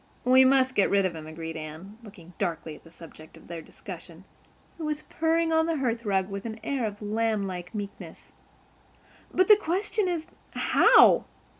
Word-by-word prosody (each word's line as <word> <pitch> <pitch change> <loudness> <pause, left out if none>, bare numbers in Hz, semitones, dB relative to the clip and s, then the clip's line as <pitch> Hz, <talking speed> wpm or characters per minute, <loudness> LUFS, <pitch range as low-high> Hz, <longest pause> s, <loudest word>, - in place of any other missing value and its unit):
"We 260 +1 +6
must 260 -1 +3
get 200 - +2
rid 200 -1 +3
of 180 -3 -2
him," 155 -1 -8
agreed 160 +1 -7
Anne, 160 +7 -9
looking 190 -6 -14
darkly 160 -2 -3
at - - -17
the 165 - -16
subject 160 -1 -14
of - - -17
their 170 -1 -7
discussion, - - -11 0.6
who 320 - -4
was 305 0 -3
purring 325 0 0
on 320 0 +3
the 330 -1 0
hearth 235 -3 -2
rug 190 -2 +1
with 200 0 -6
an 220 0 -7
air 270 -4 -1
of 210 0 -8
lamb 215 -1 0
like 180 0 -7
meekness. 205 -1 -8 1.0
"But 370 0 +2
the 425 - +8
question 410 +2 -1
is—how? 345 -1 +3
215 Hz, 175 wpm, -27 LUFS, -, 1.0 s, the